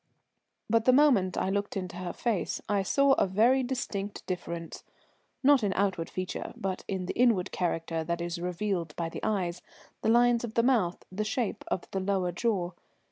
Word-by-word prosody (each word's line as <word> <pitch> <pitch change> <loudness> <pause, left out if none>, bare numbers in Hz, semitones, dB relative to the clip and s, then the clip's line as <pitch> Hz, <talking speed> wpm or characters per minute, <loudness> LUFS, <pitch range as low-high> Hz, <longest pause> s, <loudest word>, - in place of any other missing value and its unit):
But 230 +1 +2
the 255 - +6
moment 250 -10 +4
I 190 - 0
looked 200 0 -1
into 185 -2 -5
her 180 -1 -4
face 230 -6 -1
I 205 -1 +2
saw 275 +8 +3
a - - +3
very 230 +8 +4
distinct 220 -6 -4
difference, 170 -2 -5 0.6
not 280 -1 +6
in 200 -2 +1
outward 190 -4 0
feature, 185 0 -4
but 190 -1 -3
in 190 -2 -2
the - - -3
inward 230 -7 +3
character 165 -2 -1
that 170 +1 -1
is 170 0 -3
revealed 180 -2 -2
by 165 -1 -2
the - - -7
eyes, 180 -4 -1 0.4
the - - +1
lines 240 0 +4
of 225 -2 -5
the 230 - +4
mouth, 225 -9 +1
the 205 +3 -2
shape 220 +1 -2
of 180 - -1
the 195 - -1
lower 190 -2 0
jaw. 180 -2 -1
195 Hz, 185 wpm, -29 LUFS, 180-230 Hz, 0.6 s, the